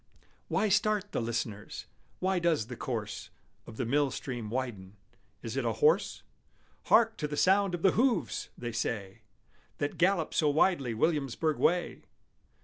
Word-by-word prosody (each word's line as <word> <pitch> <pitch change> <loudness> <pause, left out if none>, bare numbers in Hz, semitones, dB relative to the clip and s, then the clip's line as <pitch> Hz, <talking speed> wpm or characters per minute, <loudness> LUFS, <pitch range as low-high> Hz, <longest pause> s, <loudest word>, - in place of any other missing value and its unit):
Why 215 - +1
start 210 0 +1
the - - -1
listeners? 115 -3 -4 0.3
Why 190 0 +1
does 165 -9 +1
the 125 +2 -7
course 110 -4 -4 0.4
Of 110 - -10
the 125 - -1
mill 140 +4 +2
stream 120 -4 -5
widen? 110 -6 -4 0.5
Is 115 +1 -5
it 135 - 0
a 115 -1 0
horse 155 - +2 0.6
"Hark 225 -1 +4
to 150 - -2
the 150 0 -5
sound 195 +1 +3
of 170 - -8
the 190 - +6
hoofs!" 195 - 0
they 120 -1 -4
say 110 -2 -3 0.6
That 145 0 -3
gallops 180 -2 +2
so 150 - +4
wildly 145 -5 +2
Williamsburg 150 +2 0
way? 175 0 +1
145 Hz, 150 wpm, -30 LUFS, 115-180 Hz, 0.6 s, the